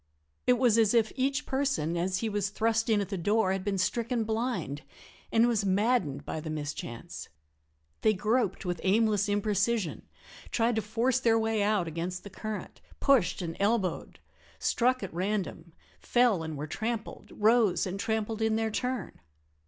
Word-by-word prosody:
It 250 - +5
was 235 -3 +4
as 220 0 +4
if 220 -2 +3
each 275 +2 0
person 265 - 0
as 185 +2 -1
he 225 - 0
was 205 -2 -1
thrust 225 +2 0
in 215 -2 +3
at 200 - -4
the 195 -3 -3
door 205 +2 +2
had 190 -1 -2
been 200 -1 -1
stricken 230 +5 0
blind, 220 - -2 0.5
and 230 +1 +4
was 225 -4 +1
maddened 200 - +1
by - - -4
the 155 +1 -6
mischance. 145 -6 -6 0.7
They 215 -1 +3
groped 210 -1 0
with 175 -2 -2
aimless 210 0 +2
imprecision, 205 -1 0 0.4
tried 230 0 +1
to - - +2
force 230 +5 +1
their 230 -3 +3
way 220 -1 +1
out 205 -4 +1
against 170 +3 -4
the 200 - -10
current, 215 +1 -6 0.2
pushed 255 -10 +3
and 165 -1 -4
elbowed, 200 -3 0 0.4
struck 255 0 +1
at 190 - -6
random, 180 -2 -3 0.3
fell 240 -7 +3
and 160 -2 -5
were 145 - -4
trampled, 220 +7 -4
rose 220 -2 +3
and 190 +1 -4
trampled 220 +1 -2
in 220 0 +2
their 220 0 0
turn. 250 +3 -3
215 Hz, 165 wpm, -29 LUFS, 185-230 Hz, 0.7 s, It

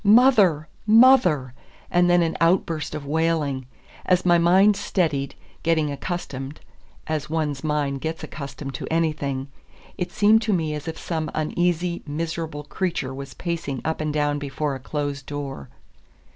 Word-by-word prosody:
"Mother! 205 - +5 0.2
mother!" 210 - +5 0.4
and 175 0 +4
then 175 0 +5
an 165 - -1
outburst 165 -3 +1
of 150 -2 -6
wailing. 150 -4 0 0.4
As 185 0 +2
my 175 -1 +5
mind 190 +5 +5
steadied, 155 -9 -1 0.3
getting 160 -3 +1
accustomed 140 -2 -5 0.5
(as 155 -2 -3
one's 150 -3 -2
mind 145 -3 -1
gets 160 0 -4
accustomed 140 -1 -7
to 130 - -5
anything), 150 -5 -1 0.5
it 180 - -2
seemed 215 +2 +4
to 215 -2 0
me 160 -4 0
as 150 0 -6
if 160 - -4
some 160 -2 -3
uneasy, 175 +2 0
miserable 160 0 -4
creature 160 -4 -2
was 135 0 -8
pacing 165 -6 -3
up 160 0 -1
and 155 -1 -1
down 145 -1 0
before 145 +1 -2
a 135 - -5
closed 145 0 -4
door. 140 - -6
155 Hz, 145 wpm, -24 LUFS, 145-175 Hz, 0.5 s, Mother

